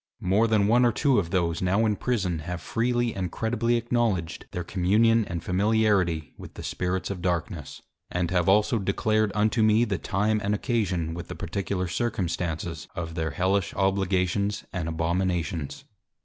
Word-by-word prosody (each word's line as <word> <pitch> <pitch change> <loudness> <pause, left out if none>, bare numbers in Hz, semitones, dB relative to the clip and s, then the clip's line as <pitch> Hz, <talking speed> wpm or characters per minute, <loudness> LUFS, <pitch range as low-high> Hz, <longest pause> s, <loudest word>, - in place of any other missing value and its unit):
More 100 +5 +3
than 110 -2 +3
one 120 +4 +4
or 120 - +4
two 135 +2 +2
of 85 -4 -2
those 85 -3 0
now 95 +5 +2
in 105 -1 +2
Prison, 100 -9 -1
have 85 +3 -5
freely 120 +2 0
and 90 -2 -3
credibly 115 +1 0
acknowledged 115 -8 -1
their 90 - -4
Communion 105 +6 +3
and 85 -2 -5
Familiarity 95 -5 +1
with - - -11
the - - -8
Spirits 90 +1 -2
of 95 -3 -5
Darkness; 85 -3 -3 0.3
and 90 -1 -1
have 90 -1 +2
also 105 +3 +3
declared 110 +2 +1
unto 110 +2 +2
me 110 +2 +4
the 100 -5 -2
Time 105 +2 0
and 100 +1 +1
Occasion, 95 - -1
with 85 0 -6
the - - -7
particular 95 -2 -3
Circumstances 85 -5 -2
of 85 -3 -4
their 80 -1 -2
Hellish 95 +3 0
Obligations 95 +1 0
and 85 -3 -2
Abominations. 85 -1 -1
95 Hz, 165 wpm, -26 LUFS, 85-110 Hz, 0.3 s, one